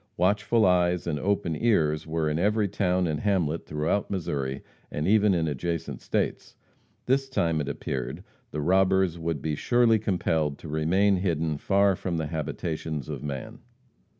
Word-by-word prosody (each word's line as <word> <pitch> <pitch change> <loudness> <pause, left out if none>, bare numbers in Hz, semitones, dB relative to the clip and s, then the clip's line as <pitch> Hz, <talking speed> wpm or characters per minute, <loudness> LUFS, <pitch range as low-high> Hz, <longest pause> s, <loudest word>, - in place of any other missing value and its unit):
Watchful 105 +2 +2
eyes 90 -1 +2
and 75 -3 -2
open 95 -2 0
ears 80 -8 +1
were 80 0 -1
in 75 +1 0
every 105 +2 +2
town 90 -2 +1
and 80 -3 -1
hamlet 85 -6 0
throughout 75 +7 -1
Missouri, 70 -8 -3 0.3
and 75 +2 -2
even 105 -1 +4
in 80 -2 0
adjacent 80 +3 -3
states. - - -2 0.5
This 135 +1 +1
time, 85 -11 +1
it 70 - -3
appeared, 65 -3 -4 0.3
the 75 - -4
robbers 95 0 +2
would 80 -4 -3
be 80 - -1
surely 115 - +3
compelled 80 -7 0
to - - -11
remain 90 +6 +2
hidden 80 -5 -1
far 100 +2 +3
from 90 -1 -3
the 80 - -1
habitations 80 -1 -4
of - - -5
man. 90 - -6
85 Hz, 155 wpm, -27 LUFS, 75-100 Hz, 0.5 s, even